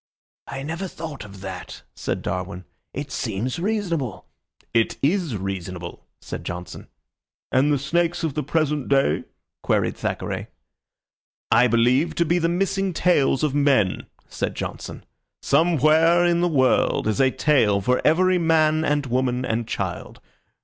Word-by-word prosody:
"I 135 0 -6
never 165 +6 -4
thought 160 - -7
of 100 -1 -12
that," 95 -2 -8
said - - -4
Darwin. 90 0 -4 0.3
"It 140 0 -6
seems 120 - -3
reasonable." 175 - -2 0.5
"It 115 -1 +1
is 160 - +1
reasonable," 90 -2 -6
said - - -7
Johnson. 90 +1 -7 0.6
"And 135 +3 +3
the 145 - +3
snakes 170 +5 0
of 160 -4 -1
the 150 - -1
present 150 -1 -1
day?" 135 0 +2 0.4
queried - - +1
Thackeray. - - -3 1.0
"I 120 +2 +6
believe 125 +7 +2
to 170 - +2
be 175 +2 +2
the 165 0 +1
missing 195 +1 0
tails 155 -6 +2
of 150 -3 +1
men," 140 -10 +2 0.2
said - - -3
Johnson. - - -6 0.4
"Somewhere 165 +2 +4
in 170 0 +2
the 175 - +2
world 130 -5 +2
is 110 +5 +1
a 130 - +5
tail 125 -9 +2
for 125 +6 +1
every 185 +3 +3
man 160 -1 +3
and 145 -2 +1
woman 125 0 0
and 115 -1 -2
child. - - -4
145 Hz, 140 wpm, -23 LUFS, 120-165 Hz, 1.0 s, I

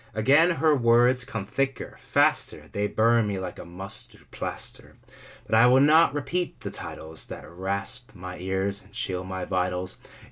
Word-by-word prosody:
Again 140 +10 +5
her 155 +1 +3
words 120 0 +4
come 110 -5 -5
thicker, 135 +5 -3
faster, - - +1
They 105 0 -1
burn 115 +1 +3
me 100 -1 -2
like 95 -1 -6
a - - -8
mustard 95 +3 -5
plaster. - - -5 0.5
But - - -6
I 115 +2 +7
will 130 +2 +6
not 150 +1 +5
repeat 165 +5 -2
the - - -5
titles 80 0 -7
That - - -9
rasp 100 +7 -3
my 90 -1 -8
ears 95 +2 -1
and 100 +1 -21
chill 90 -1 -3
my 95 0 -5
vitals. 90 0 -2
105 Hz, 165 wpm, -26 LUFS, 95-130 Hz, 0.5 s, I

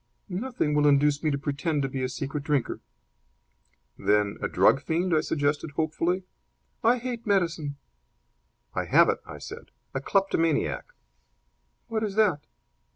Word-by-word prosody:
"Nothing 200 -4 -1
will 150 0 +4
induce 145 +1 +4
me 155 - +1
to 140 - 0
pretend 145 +2 -1
to - - +1
be 130 0 -4
a 130 - 0
secret 140 +2 -4
drinker." 145 -4 0 1.2
"Then 105 -1 +2
a - - 0
drug 135 - +4
fiend?" 170 +2 0
I 155 - +4
suggested, 145 +1 0
hopefully. 165 +4 0 0.6
"I 235 +2 +5
hate 240 -2 -5
medicine." 165 -7 0 1.0
"I - - -1
have - - +5
it!" - - +1
I - - -8
said. - - -9 0.2
"A 135 - -2
kleptomaniac." 165 - +1 1.0
"What 220 -1 -2
is 205 -2 -2
that?" 185 -9 +2
155 Hz, 145 wpm, -27 LUFS, 140-185 Hz, 1.2 s, I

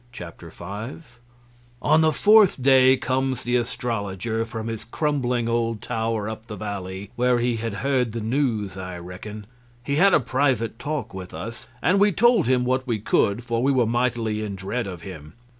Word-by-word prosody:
Chapter 90 -8 -10
5 120 - -8 0.6
On 155 +4 +4
the 160 0 +4
fourth 210 +1 +5
day 130 0 +5
comes 130 0 -1
the 120 +1 0
astrologer 115 -2 -2
from 115 -1 -6
his 115 -1 -4
crumbling 125 -2 -1
old 115 -1 0
tower 110 -1 -2
up 110 +1 -7
the 105 - -6
valley, 100 -2 -6
where 125 0 +2
he 120 -1 0
had 115 -2 -4
heard 130 -4 +1
the 115 - -4
news, 110 - -1
I 90 -2 -6
reckon. 100 +4 -8 0.4
He 140 +3 -1
had 195 +3 +6
a - - +5
private 125 -3 0
talk 150 -6 -4
with 95 -1 -8
us, 115 +1 -7 0.2
and 185 +4 +3
we 205 +1 +5
told 230 - +4
him 125 -1 +2
what 130 +1 0
we 115 -3 0
could, 105 +2 +1
for 115 -1 -1
we 135 +2 +3
were 130 -3 +3
mightily 115 -2 0
in 100 -2 -4
dread 100 +5 -3
of 90 -3 -8
him. 80 -5 -9
115 Hz, 180 wpm, -24 LUFS, 105-130 Hz, 0.6 s, had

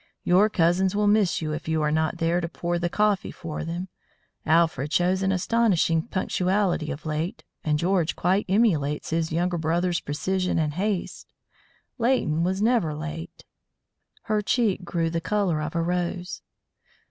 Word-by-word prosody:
Your 195 +4 +4
cousins 185 +1 +2
will 210 0 +2
miss 205 -5 +2
you 155 -1 -2
if 155 - -6
you 160 -1 0
are 150 - +1
not 160 +2 0
there 170 +1 +1
to 170 - -3
pour 175 +1 -2
the 175 0 -1
coffee 210 +1 +1
for 160 -3 -6
them. 170 +3 -4 0.6
Alfred 160 -3 +2
shows 180 +3 +2
an 190 0 +1
astonishing 185 -4 +2
punctuality 185 -3 0
of 145 +4 -6
late, 160 +8 -3 0.2
and 150 -1 +1
George 175 0 +1
quite 190 +4 +1
emulates 165 -10 +1
his 165 0 0
younger 175 +1 0
brother's 170 +2 0
precision 185 +5 -1
and 155 -2 0
haste. 195 +2 -3 0.7
Leighton 225 -10 +1
was 190 +3 0
never 220 -10 +2
late." 160 +2 -7 0.8
Her 215 -1 0
cheek 210 -3 +1
grew 170 -2 -1
the 165 0 -1
colour 185 -4 0
of 155 +2 -4
a 165 - +1
rose. 180 +1 -2
175 Hz, 160 wpm, -25 LUFS, 160-190 Hz, 0.8 s, Your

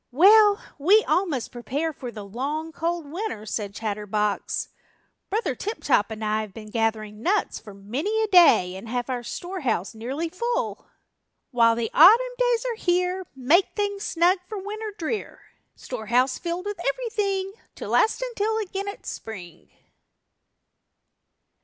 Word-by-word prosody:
"Well, 410 - +6 0.2
we 400 +9 +5
all 380 +2 +2
must 270 -8 -3
prepare 280 +6 -3
for 255 -3 -7
the 210 -3 -8
long, 285 +10 -4
cold 335 0 -2
winter," 310 - -5
said 205 -2 -4
Chatterbox. 210 -1 -2 0.6
"Brother 435 +4 0
Tip 430 +2 -5
Top 205 - +3
and 220 0 -5
I 215 +1 +1
have 210 -3 -9
been 215 -2 -10
gathering 220 -2 -1
nuts 400 - 0
for 205 -3 -12
many 285 - -2
a - - 0
day 340 - +6
and 205 +4 -9
have 245 +1 -2
our 250 -1 -2
storehouse 260 - -3
nearly 260 +9 -3
full." 475 +8 -3 0.6
While 230 -2 +4
the 230 -1 -2
Autumn 470 +10 +7
days - - +2
are 475 -2 -2
here 360 +1 +1
Make 295 +9 +2
things 405 -1 -2
snug 355 0 +2
for 430 - -5
Winter 425 +2 -5
drear; 355 +6 -4 0.3
Storehouse 250 +2 0
filled 345 +2 -4
with 410 -3 -4
everything 395 - -1 0.2
To - - -7
last 445 +3 +2
until 445 -3 -1
again 395 -2 -3
it's 405 - -6
Spring. 180 -7 -9
325 Hz, 145 wpm, -25 LUFS, -, 0.6 s, Autumn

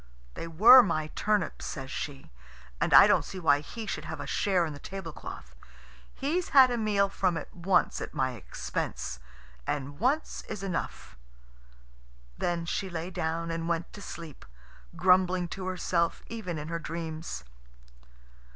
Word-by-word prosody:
"They 165 - -6
were 225 +11 +9
my 155 -7 -1
turnips," 210 -4 0
says 135 -3 -6
she, 140 -2 -6 0.5
"and - - +1
I - - +10
don't - - +4
see 190 - -7
why 145 -4 +4
he 220 +10 -7
should - - -4
have - - -6
a - - -5
share 190 -4 +1
in 155 - -5
the 145 - -10
tablecloth. 160 - -8 0.6
He's 325 +6 -1
had 260 -3 +7
a 240 - 0
meal 205 -2 +2
from 185 -3 0
it - - -7
once 180 +1 +1
at - - -5
my 130 -1 0
expense, 95 - -5 0.5
and 145 +1 -3
once 275 +8 0
is 210 -2 -5
enough." 185 - -4 1.2
Then 170 - -1
she 190 +3 -2
lay 170 +1 -5
down 165 -1 -2
and 165 0 -3
went 170 -1 -2
to 205 - -9
sleep, 165 -7 -9 0.5
grumbling 185 -1 +3
to 185 +1 -5
herself 175 -2 0
even 205 -8 -4
in 150 +1 -6
her 170 0 -2
dreams. 160 - -5
170 Hz, 155 wpm, -29 LUFS, 160-195 Hz, 1.2 s, I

